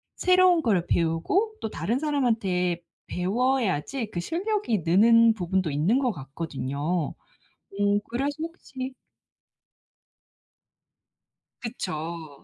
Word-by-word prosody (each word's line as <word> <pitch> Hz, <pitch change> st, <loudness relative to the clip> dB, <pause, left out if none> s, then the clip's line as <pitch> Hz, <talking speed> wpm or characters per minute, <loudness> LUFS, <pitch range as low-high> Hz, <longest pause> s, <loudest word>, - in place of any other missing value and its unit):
새로운 365 Hz, -2 st, +4 dB
거를 190 Hz, -8 st, +1 dB
배우고 175 Hz, -, +1 dB
또 220 Hz, -, -2 dB
다른 235 Hz, +4 st, -1 dB
사람한테 215 Hz, -, 0 dB, 0.3 s
배워야지 225 Hz, -, 0 dB
그 175 Hz, -, -3 dB
실력이 350 Hz, -, -1 dB
느는 230 Hz, +6 st, +6 dB
부분도 185 Hz, -2 st, 0 dB
있는 175 Hz, -, +2 dB
것 255 Hz, -3 st, +1 dB
같거든요. 145 Hz, +1 st, -3 dB, 0.7 s
오 205 Hz, 0 st, +3 dB
그래서 270 Hz, +5 st, -1 dB
혹시 265 Hz, -6 st, -6 dB, 2.7 s
그쵸. 165 Hz, -, -5 dB
210 Hz, 210 characters per minute, -26 LUFS, 170-265 Hz, 2.7 s, 느는